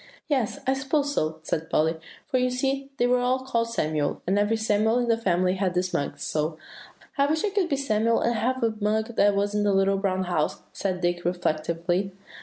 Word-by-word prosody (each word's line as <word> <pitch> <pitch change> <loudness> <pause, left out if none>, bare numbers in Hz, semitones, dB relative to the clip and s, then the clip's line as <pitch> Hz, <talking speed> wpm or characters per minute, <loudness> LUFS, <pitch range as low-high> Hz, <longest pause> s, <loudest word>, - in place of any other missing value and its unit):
"Yes, 265 -5 0
I 265 - +3
suppose 280 +2 0
so," 155 - -1
said 160 0 -3
Polly; 160 +2 +2 0.3
"for 260 -4 0
you 250 0 +2
see 270 +2 -1
they 245 - +2
were 250 0 +3
all 255 +1 +1
called 230 -3 0
Samuel, 155 -9 -1
and 195 +3 +2
every 210 +2 +2
Samuel 220 +1 +2
in 245 -1 +1
the 230 - +5
family 185 -4 +1
had 185 -2 0
this 180 +1 0
mug, 145 - -2
so" 155 +1 -2 0.6
"I 280 - +4
wish 315 +5 +1
I 415 - -1
could 380 -3 +1
be 280 - +1
Samuel, 230 -4 +1
and 235 - +2
have 255 +2 -1
a 225 -1 +2
mug 220 +2 0
that 205 0 +4
was 200 +1 0
in 210 - +1
The 205 -1 +2
Little 195 0 +3
Brown 190 -1 0
House," 175 -4 -1
said 185 -2 -2
Dick 175 0 0
reflectively. 175 +2 -1
210 Hz, 215 wpm, -26 LUFS, 180-250 Hz, 0.6 s, the